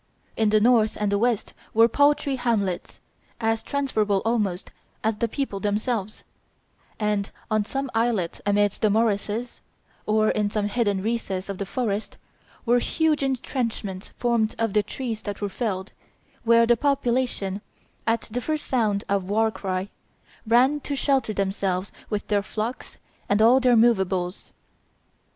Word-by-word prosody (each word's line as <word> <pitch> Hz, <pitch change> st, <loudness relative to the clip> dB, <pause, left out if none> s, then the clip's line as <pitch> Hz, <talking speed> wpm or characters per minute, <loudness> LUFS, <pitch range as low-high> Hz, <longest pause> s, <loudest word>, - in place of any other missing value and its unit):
In 220 Hz, -1 st, +2 dB
the 215 Hz, 0 st, +4 dB
north 220 Hz, -1 st, +3 dB
and 210 Hz, -1 st, 0 dB
the 200 Hz, -, +2 dB
west 235 Hz, -2 st, 0 dB, 0.2 s
were 225 Hz, +1 st, +7 dB
paltry 285 Hz, +2 st, +2 dB
hamlets, 205 Hz, -8 st, -1 dB, 0.4 s
as 225 Hz, -1 st, +1 dB
transferable 215 Hz, -8 st, 0 dB
almost 210 Hz, -6 st, -1 dB, 0.3 s
as 220 Hz, -1 st, 0 dB
the 235 Hz, -, 0 dB
people 230 Hz, -4 st, -3 dB
themselves; 210 Hz, +1 st, -2 dB, 0.8 s
and 210 Hz, -2 st, 0 dB, 0.2 s
on 215 Hz, -1 st, +2 dB
some 270 Hz, +3 st, -3 dB
islet 225 Hz, -7 st, 0 dB
amidst 205 Hz, 0 st, +1 dB
the 215 Hz, -, +4 dB
morasses, 220 Hz, +2 st, 0 dB, 0.5 s
or 215 Hz, 0 st, +3 dB
in 210 Hz, -1 st, 0 dB
some 210 Hz, 0 st, -1 dB
hidden 205 Hz, -4 st, 0 dB
recess 205 Hz, -4 st, -2 dB
of 195 Hz, -, -5 dB
the 200 Hz, -, -3 dB
forest, 215 Hz, -2 st, -2 dB, 0.5 s
were 240 Hz, +1 st, +4 dB
huge 315 Hz, +3 st, +1 dB
intrenchments 235 Hz, -7 st, -2 dB
formed 235 Hz, -3 st, +1 dB
of 225 Hz, -3 st, 0 dB
the 210 Hz, -, +4 dB
trees 225 Hz, 0 st, -5 dB
that 205 Hz, -1 st, -5 dB
were 205 Hz, -, -2 dB
felled, 190 Hz, -2 st, -3 dB, 0.5 s
where 230 Hz, 0 st, +5 dB
the 240 Hz, +1 st, +4 dB
population, 245 Hz, -7 st, 0 dB, 0.5 s
at 230 Hz, 0 st, +2 dB
the 245 Hz, +3 st, -5 dB
first 310 Hz, +3 st, -2 dB
sound 215 Hz, -6 st, +1 dB
of 195 Hz, -2 st, 0 dB
the -, -, -5 dB
war 220 Hz, +1 st, +3 dB
cry, 190 Hz, -2 st, -3 dB, 0.6 s
ran 255 Hz, +6 st, +4 dB
to 285 Hz, 0 st, -4 dB
shelter 270 Hz, -4 st, +1 dB
themselves 195 Hz, -2 st, -1 dB, 0.2 s
with 210 Hz, -2 st, -2 dB
their 205 Hz, -1 st, +2 dB
flocks 220 Hz, +5 st, -5 dB, 0.3 s
and 205 Hz, -, +3 dB
all 235 Hz, +4 st, +6 dB
their 250 Hz, -2 st, +4 dB
movables. 190 Hz, -5 st, +1 dB
220 Hz, 150 wpm, -25 LUFS, 200-240 Hz, 0.8 s, were